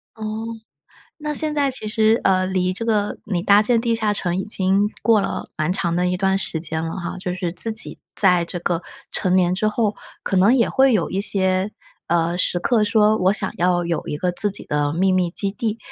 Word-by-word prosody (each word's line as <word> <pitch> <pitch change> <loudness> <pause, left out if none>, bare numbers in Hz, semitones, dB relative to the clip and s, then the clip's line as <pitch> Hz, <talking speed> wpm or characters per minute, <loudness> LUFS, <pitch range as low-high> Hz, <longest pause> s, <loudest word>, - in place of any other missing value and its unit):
哦， 220 0 -5 0.7
那 300 -1 -3
现 305 +1 0
在 280 -2 +1
其 215 -4 -6
实， 220 +1 +3
呃， 185 -1 +3
离 185 -1 0
这 230 - -5
个 210 -2 0
你 180 -4 -1
搭 200 +3 +5
建 230 +2 +2
地 230 0 0
下 215 -2 0
城 180 -3 -2
已 190 - -1
经 200 0 +1
过 220 -3 +4
了 - - -4
蛮 155 +1 -1
长 170 -2 -1
的 180 0 +1
一 180 - 0
段 190 0 +1
时 165 -4 -2
间 160 0 -3
了 165 +2 -4
哈， 175 0 -5
就 180 -1 -4
是 180 -2 -3
自 220 +5 -2
己 220 - -2 0.2
在 180 -3 +4
这 175 +1 -6
个 175 0 -1 0.3
成 185 -1 0
年 180 0 +3
之 215 - 0
后， 215 -1 0 0.3
可 195 - -2
能 195 +6 +5
也 245 -3 +3
会 270 0 +4
有 205 -8 +1
一 195 +2 -1
些， 190 0 0 0.4
呃， 170 +1 +1
时 175 -1 0
刻 220 +2 +2
说 215 0 +3
我 185 -1 +3
想 195 -3 -2
要 175 0 +1
有 170 -1 -2
一 150 - -3
个 180 +3 0
自 205 +3 0
己 - - -8
的 145 0 0
秘 190 +3 +2
密 180 -2 +1
基 200 +1 -1
地。 220 +2 -3
190 Hz, 240 characters per minute, -21 LUFS, 180-215 Hz, 0.7 s, 搭